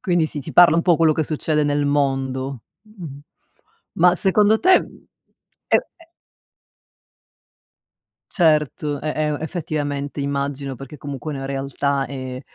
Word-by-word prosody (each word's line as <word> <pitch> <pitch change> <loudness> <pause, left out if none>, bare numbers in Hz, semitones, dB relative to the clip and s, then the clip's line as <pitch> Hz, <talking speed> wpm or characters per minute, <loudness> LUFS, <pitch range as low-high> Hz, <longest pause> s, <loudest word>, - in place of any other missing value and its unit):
Quindi 175 -3 +1
si 150 - -5
si - - -7
parla 175 -2 +7
un 170 - +2
po' 175 -2 +4
quello 160 -1 +4
che 155 +1 -1
succede 155 0 -1
nel 145 0 0
mondo, 135 -2 -1 0.2
mh-mh, 180 -10 -10 0.8
ma 180 +1 +4
secondo 210 +4 +3
te, 370 +1 +5
mhmm, - - -15 0.6
e - - +5 0.2
e 335 - -20 2.3
Certo, 150 -4 +1
e 155 - -4
e 150 -1 -1
effettivamente 145 -4 -4
immagino, 140 -1 -3
perché 135 +4 -10
comunque 145 +1 -6
la 135 -1 -5
realtà 135 0 -2
è, 130 -1 -6
145 Hz, 135 wpm, -21 LUFS, 140-165 Hz, 2.3 s, parla